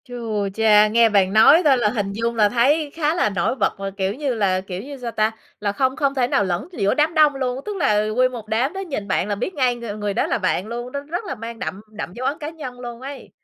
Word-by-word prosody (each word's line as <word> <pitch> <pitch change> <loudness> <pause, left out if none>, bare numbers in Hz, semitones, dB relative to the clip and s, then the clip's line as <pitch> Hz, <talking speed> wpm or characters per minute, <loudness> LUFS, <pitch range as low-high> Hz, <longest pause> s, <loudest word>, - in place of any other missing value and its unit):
Chu 225 -5 -3
cha! 215 -1 +5
Nghe 230 +1 +4
bạn 195 -2 +2
nói 280 +10 +7
thôi 275 -3 +5
là 235 -3 +2
hình 205 -3 -2
dung 230 +2 -2
là 210 -2 +4
thấy 285 +6 +2
khá 315 0 0
là 350 - +2
nổi 200 +5 -1
bật 210 -5 -1
là 195 0 -4
kiểu 190 0 0
như 275 0 -2
là 190 -4 +1
kiểu 185 -1 -6
như 280 +1 -8
sao 245 -2 -5
ta? 215 0 +1 0.3
Là 205 -1 -1
không 260 +5 0
không 280 -3 0
thể 250 -2 +2
nào 205 - +2
lẫn 180 - -2
giữa 200 - 0
đám 310 +2 +1
đông 305 -3 +4
luôn, 260 -1 -2
tức 420 - -4
là 215 - +2
nguyên 255 +4 +2
một 230 -4 -8
đám 235 +7 0
đó 385 - -5
nhìn 280 - -4
bạn 190 0 0
là 205 - -1
biết 245 - -3
ngay 255 -5 +1
ng 225 -3 -6
người 205 -1 -2
đó - - 0
là - - 0
bạn 190 - -1
luôn, 240 +2 -5
nó 280 - -4
rất 340 +8 -5
là 315 - -4
mang 230 0 -8
đậm 195 - -5
đậm 210 -4 -6
dấu 255 +5 -3
ấn 290 - -1
cá 300 - -4
nhân 275 -6 -8
luôn 240 -1 -8
ấy. 275 +1 -8
235 Hz, 275 wpm, -21 LUFS, 210-275 Hz, 0.3 s, nói